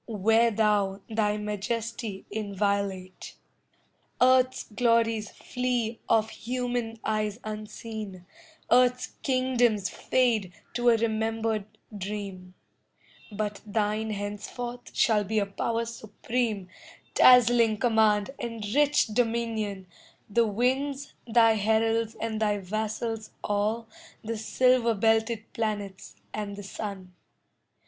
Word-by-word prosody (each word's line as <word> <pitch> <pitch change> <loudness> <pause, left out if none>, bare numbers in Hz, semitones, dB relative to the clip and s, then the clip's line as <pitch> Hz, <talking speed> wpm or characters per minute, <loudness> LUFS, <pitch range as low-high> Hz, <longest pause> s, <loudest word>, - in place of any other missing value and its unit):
Wear 225 +2 +3
thou 205 -3 +1
thy 210 -1 +1
majesty 210 0 -4
inviolate. 200 -2 -2 0.8
Earth's 255 0 +4
glories 230 -1 +1
flee 245 -2 -2
of 220 -1 +3
human 245 -2 -3
eyes 215 0 -1
unseen, 215 -3 -7 0.5
Earth's 250 +1 +4
kingdoms 245 -6 +2
fade 225 -8 +1 0.2
to 240 0 +3
a 235 - +6
remembered 220 -1 -1 0.3
dream, 195 -2 -6 0.8
But 210 0 -3
thine 215 +1 -1
henceforth 215 +4 -5
shall 215 -3 +3
be 215 +2 -2
a 205 - +3
power 230 +3 -2
supreme, 220 -2 -3 0.5
Dazzling 240 -3 +6
command 220 -1 +3
and 230 -3 -4
rich 295 +1 +4
dominion, 225 -3 -1 0.4
The 230 +2 +2
winds 265 +6 -1
thy 230 -1 +5
heralds 225 +1 +1
and 220 -1 -3
thy 210 -1 +2
vassals 220 +3 -3
all 215 +3 0 0.4
The 230 +1 -3
silver 245 0 +3
belted 225 +1 +1
planets 205 -3 -4 0.2
and 205 -1 -4
the 205 - -8
sun. 195 -2 -6
220 Hz, 100 wpm, -27 LUFS, 205-235 Hz, 0.8 s, a